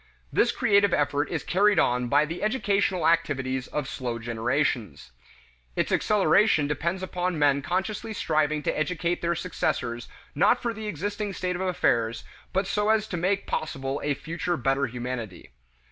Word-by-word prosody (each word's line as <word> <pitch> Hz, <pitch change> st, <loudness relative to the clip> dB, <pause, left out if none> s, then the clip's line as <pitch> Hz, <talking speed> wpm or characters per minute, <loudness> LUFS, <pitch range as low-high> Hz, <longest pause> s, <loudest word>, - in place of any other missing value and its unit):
This -, -, +3 dB
creative 200 Hz, -5 st, +3 dB
effort 145 Hz, 0 st, 0 dB
is 160 Hz, -4 st, -3 dB
carried 200 Hz, +3 st, +3 dB
on 125 Hz, 0 st, +2 dB
by 145 Hz, +4 st, +4 dB
the 165 Hz, +3 st, -6 dB
educational 200 Hz, -6 st, +1 dB
activities 135 Hz, -6 st, 0 dB
of 150 Hz, -3 st, -3 dB
slow 125 Hz, -4 st, -4 dB
generations. 115 Hz, -, -2 dB, 0.6 s
Its -, -, 0 dB
acceleration 205 Hz, -5 st, +3 dB
depends 170 Hz, +5 st, -2 dB
upon 180 Hz, -2 st, -2 dB
men 140 Hz, -1 st, +3 dB
consciously 190 Hz, +8 st, -2 dB
striving 155 Hz, -6 st, 0 dB
to -, -, 0 dB
educate 170 Hz, +2 st, -1 dB
their 170 Hz, 0 st, 0 dB
successors 130 Hz, -9 st, -2 dB, 0.3 s
not 175 Hz, +8 st, +4 dB
for 235 Hz, -1 st, -2 dB
the 220 Hz, -1 st, -6 dB
existing 205 Hz, +3 st, -3 dB
state 180 Hz, -1 st, -2 dB
of 180 Hz, -, -4 dB
affairs 120 Hz, -11 st, +1 dB, 0.3 s
but 190 Hz, +1 st, +1 dB
so 210 Hz, +2 st, 0 dB
as 220 Hz, -1 st, +3 dB
to -, -, -3 dB
make 190 Hz, +4 st, 0 dB
possible 135 Hz, -2 st, -3 dB
a 145 Hz, -1 st, 0 dB
future 170 Hz, +3 st, -3 dB
better 135 Hz, +2 st, +1 dB
humanity. 120 Hz, -, -6 dB
160 Hz, 155 wpm, -26 LUFS, 135-190 Hz, 0.6 s, by